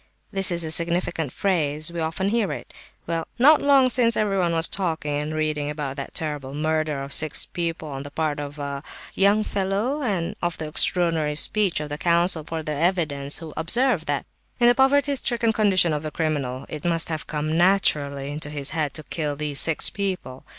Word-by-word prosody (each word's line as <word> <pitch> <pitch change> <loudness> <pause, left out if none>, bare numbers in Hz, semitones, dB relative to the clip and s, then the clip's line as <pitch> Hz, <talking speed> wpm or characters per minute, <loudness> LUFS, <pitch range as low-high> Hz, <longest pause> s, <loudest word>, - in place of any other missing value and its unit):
This 195 -1 +4
is 170 -1 0
a 160 - -3
significant 170 -3 +1
phrase; 155 -4 -1
we 170 - -4
often 165 +5 -1
hear 215 -6 0
it. - - -8 0.3
Well, 165 -1 -3
not 295 +5 +6
long 275 -2 +5
since 240 -2 +2
everyone 195 -5 +1
was 165 0 +5
talking 160 -6 -1
and 155 +1 -5
reading 155 -2 -1
about 145 -3 -4
that 140 - -6
terrible 145 -4 -4
murder 155 -2 -1
of 140 0 -6
six 155 -2 0
people 165 -2 -4
on 135 -2 -6
the 145 - -8
part 150 0 -2
of 145 0 -7
a—young 150 +8 -1
fellow, 205 +9 -2
and 200 -6 -2
of 175 -1 -2
the 160 - -5
extraordinary 160 -1 +2
speech 200 +3 +1
of 150 -1 -6
the 145 +1 -5
counsel 170 -1 +2
for 160 +1 -5
the 150 - -3 0.2
defence, 145 -5 -3
who 160 -3 -9
observed 200 - +1
that 145 -1 -1 0.3
in 240 - +3
the 240 - +6
poverty 280 +2 +3
stricken 235 -3 0
condition 190 -6 +3
of 150 - -2
the 155 - -5
criminal 145 -5 -3
it 150 -1 -7
must 165 -1 +1
have 160 -2 -4
come 155 +1 -2
naturally 145 -6 +2
into 150 0 -4
his 145 -2 -2
head 150 -4 -2
to 155 - -5
kill 150 -2 -3
these 145 -1 -2
six 165 -2 +6
people. 185 -10 -4
160 Hz, 190 wpm, -23 LUFS, 150-190 Hz, 0.3 s, not